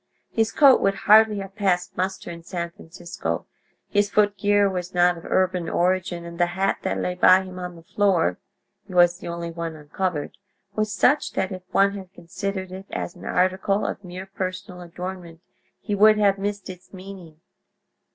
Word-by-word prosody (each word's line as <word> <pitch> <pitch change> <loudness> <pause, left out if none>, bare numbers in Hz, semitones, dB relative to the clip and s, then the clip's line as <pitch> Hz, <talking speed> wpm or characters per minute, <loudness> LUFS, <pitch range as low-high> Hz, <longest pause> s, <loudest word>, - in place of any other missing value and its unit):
His 225 -1 +1
coat 275 -3 +6
would 195 0 +2
hardly 215 0 +6
have 195 0 -9
passed 185 -4 0
muster 185 -1 -3
in 170 0 -9
San 170 0 -5
Francisco: 170 +1 -6 0.4
his 205 0 +1
footgear 205 -1 +3
was 180 -1 -4
not 175 0 +4
of 165 - -12
urban 185 -3 0
origin, 175 -1 0
and 170 0 -9
the 175 - +3
hat 195 +1 +1
that - - -2
lay 180 - -1
by 185 +1 +5
him 185 -1 -9
on 180 -1 -6
the 165 - -14
floor 180 - +1 0.5
(he 185 - -9
was 175 0 +5
the - - -8
only 170 0 -4
one 165 -1 -5
uncovered) 155 +1 -3 0.4
was 215 0 -1
such 270 +7 +2
that 190 0 -1
if 185 -1 -6
one 200 0 +3
had 190 -2 -9
considered 190 +2 -5
it 190 +1 -9
as 175 - -5
an - - -12
article 185 +2 +1
of - - -4
mere 180 +1 -8
personal 185 -2 -6
adornment 175 -1 -8 0.4
he 210 - -4
would 215 +1 +6
have 200 -2 +3
missed 205 0 -3
its 185 -1 -11
meaning. 185 -4 -11
185 Hz, 180 wpm, -24 LUFS, 175-200 Hz, 0.5 s, coat